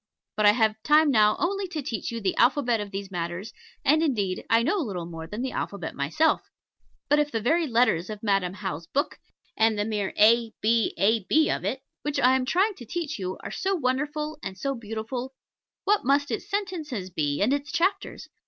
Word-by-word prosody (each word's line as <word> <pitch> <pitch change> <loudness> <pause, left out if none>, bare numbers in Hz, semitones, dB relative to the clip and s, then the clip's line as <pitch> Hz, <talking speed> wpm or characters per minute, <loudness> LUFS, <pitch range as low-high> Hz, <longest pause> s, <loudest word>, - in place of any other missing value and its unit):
But 215 0 +4
I 205 - +7
have 220 -1 +1
time 300 +2 +5
now 215 -3 +4
only 390 +2 -1
to 320 -4 -4
teach 245 -5 -3
you 230 - -4
the 195 -4 -1
alphabet 240 -2 +3
of 205 - -6
these 195 0 -6
matters 175 +3 -4 0.3
and, 305 +3 +4
indeed, 205 - 0
I 230 +1 +4
know 410 - +1
little 200 - -3
more 165 -1 -8
than 210 +8 -5
the 265 - -2
alphabet 200 - -4
myself; 160 - +1 0.7
but 295 +1 +4
if 295 0 +1
the 225 - -1
very 320 +9 +2
letters 230 - +2
of 215 0 -7
Madam 195 -3 +1
How's 175 -5 -5
book, 285 +9 -2 0.4
and 220 -1 +3
the 205 - 0
mere 210 -3 -2
A, 225 +1 +4
B, 225 0 +2
AB, 220 - +3
of - - -2
it, 270 +1 -2 0.2
which 295 0 -2
I 255 +1 +5
am 260 -1 0
trying 385 +10 +2
to 240 - -10
teach 325 -2 -4
you, 185 0 -4
are - - -6
so 390 0 -1
wonderful 300 +2 -2
and 190 - -6
so 275 +8 -2
beautiful, 235 +3 -5 0.5
what 415 0 +2
must 285 +2 +2
its - - -4
sentences 315 - -3
be 145 -4 -1
and 220 +7 +3
its 285 +2 -2
chapters? 355 +4 -1
235 Hz, 200 wpm, -26 LUFS, 205-295 Hz, 0.7 s, I